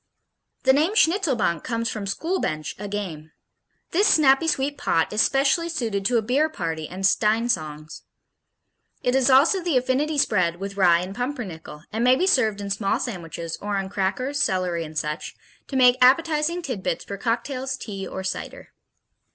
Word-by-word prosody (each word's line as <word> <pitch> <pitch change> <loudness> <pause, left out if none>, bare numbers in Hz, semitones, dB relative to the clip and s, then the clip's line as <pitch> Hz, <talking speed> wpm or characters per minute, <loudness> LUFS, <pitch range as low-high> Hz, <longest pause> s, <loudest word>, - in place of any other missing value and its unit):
The 265 - +5
name 315 +9 +1
Schnitzelbank 290 - +2
comes 230 -2 -2
from 210 -3 -5
"school 335 - -2
bench," 155 -1 -3
a 205 - -5
game. 180 -7 -6 0.6
This 400 +5 +3
snappy 295 -2 +4
sweet 285 -2 0
pot 165 - 0
is 210 - +3
specially 275 +5 +2
suited 225 -11 -2
to 240 +3 +3
a 225 - 0
beer 275 +8 +1
party 165 - -4
and 190 +1 -3
stein 220 +5 +2
songs. 155 -6 -3 1.0
It 250 - +1
is 265 0 +3
also 285 +9 +5
the 335 -6 +1
affinity 270 +5 0
spread 180 -11 +2
with 195 +2 -6
rye 175 -3 +4
and 185 +2 -6
pumpernickel, 200 - -6
and 225 +2 -1
may 250 +1 +5
be 360 - +1
served 220 - +2
in 200 0 -5
small 195 0 0
sandwiches 170 - -5
or 205 0 -2
on 195 -1 -3
crackers, 210 +9 -2
celery 180 -3 0
and 155 0 -9
such, 150 0 -4 0.3
to 275 - -7
make 250 -1 +5
appetizing 315 +5 +3
tidbits 190 - -3
for 200 - -5
cocktails, 255 +4 -2
tea, 195 -5 -6
or 190 - -6
cider. 190 - -5
230 Hz, 170 wpm, -24 LUFS, 190-275 Hz, 1.0 s, The